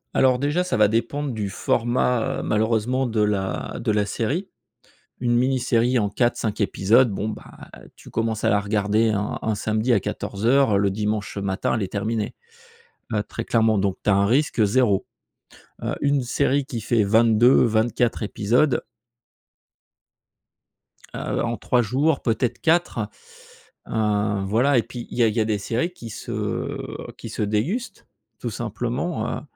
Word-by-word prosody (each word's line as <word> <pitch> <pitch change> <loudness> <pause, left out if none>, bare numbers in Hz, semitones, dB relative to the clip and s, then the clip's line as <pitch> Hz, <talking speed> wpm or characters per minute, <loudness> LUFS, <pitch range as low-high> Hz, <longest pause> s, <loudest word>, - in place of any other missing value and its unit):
Alors 130 -1 +4
déjà, 145 +6 0
ça 180 - -1
va 105 -1 +5
dépendre 120 +6 -1
du 105 -3 -3
format, 120 +3 0
heu, - - -4
malheureusement 115 +4 +1
de 110 -2 0
la 100 -3 -1
de 115 - 0
la 105 -1 +1
série. 130 - -2 0.7
Une 120 -1 +2
mini 130 +1 +2
série 120 0 +2
en 105 - 0
4-5 115 -1 0
épisodes, 110 +5 +3
bon, 105 +2 -2
bah, 110 - -10 0.2
tu - - -15
commences 115 -1 -1
à - - +3
la 100 - +3
regarder 105 +2 +1
un 105 -1 -2
un 110 - -1
samedi 110 +4 0
à 110 - +4
14:00 105 +3 +1
le 100 0 +2
dimanche, 105 +1 -2
heu, 100 - -3
matin 95 +2 -1
elle 110 - -2
est 95 - -8
terminée, 110 +1 -2 0.8
heu, 105 -1 0
très 115 - -6
clairement 110 -2 +2
donc 95 -1 0
tu - - +3
as - - +5
un 100 +1 +3
risque 125 0 +2
0. 105 -2 +2 0.8
Heu, - - -1
une 140 -1 +2
série 140 +2 0
qui 115 -5 -5
fait 115 +1 +2
22-24 115 +2 +3
épisodes 120 +6 +1 2.3
heu, - - -2
en 120 -1 -2
3 125 +4 +1
jours 135 +6 +1
peut-être 120 +1 -1
4, 160 -10 +1 0.8
heu 105 -2 0
voilà, 125 +7 +3
et 115 - +3
puis 120 0 -8
il - - -7
y 120 - +4
a - - +5
il 110 - -1
y 115 - +2
a - - +1
des 110 -1 0
séries 120 - -1
qui 115 -9 -9
se, - - -7
heu, - - -3 0.2
qui - - -8
se - - -5
dégustent 140 - -2 0.3
tout - - -3
simplement, - - -3
heu, - - -14
115 Hz, 165 wpm, -23 LUFS, 105-125 Hz, 2.3 s, va